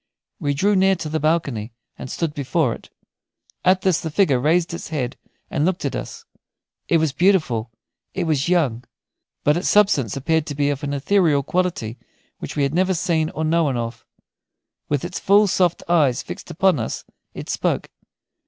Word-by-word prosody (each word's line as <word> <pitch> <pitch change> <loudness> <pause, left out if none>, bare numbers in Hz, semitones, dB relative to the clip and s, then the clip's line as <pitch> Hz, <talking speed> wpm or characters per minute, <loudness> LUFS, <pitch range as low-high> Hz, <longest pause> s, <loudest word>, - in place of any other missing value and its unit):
We 145 -1 -1
drew 200 +7 +2
near 190 0 +4
to 165 -4 -5
the 160 +1 -1
balcony 140 -8 -1 0.2
and 130 - -8
stood 165 +1 -2
before 145 -2 0
it. - - -12 0.7
At 185 +1 +4
this 185 -4 +2
the 160 - -3
figure 150 -6 +2
raised 165 +5 +1
its 170 - -6
head 130 -6 -3 0.4
and 150 - 0
looked 175 -2 0
at 140 - -2
us. - - -7 0.6
It 170 - +4
was 160 -2 +1
beautiful, 155 - +2 0.5
it 190 - 0
was 155 -1 0
young; 140 -10 +1 0.6
but 150 +2 +3
its 180 - -1
substance 190 - +3
seemed 160 +2 0
to 145 - -4
be 145 0 +1
of 140 0 -4
an 145 -1 -2
ethereal 155 -1 +2
quality 170 -10 -2 0.4
which - - -7
we 145 - +1
had 140 +1 0
never 185 +2 +2
seen 160 -2 0
or 160 0 -3
known 155 -5 +1
of. 115 0 -5 0.9
With 145 +2 0
its 175 -1 -5
full, 205 +2 +5
soft 180 -3 +1
eyes 145 -7 +2
fixed - - -8
upon 185 -1 +2
us, - - -4 0.3
it - - -7
spoke. - - -1
160 Hz, 180 wpm, -22 LUFS, 140-180 Hz, 0.9 s, full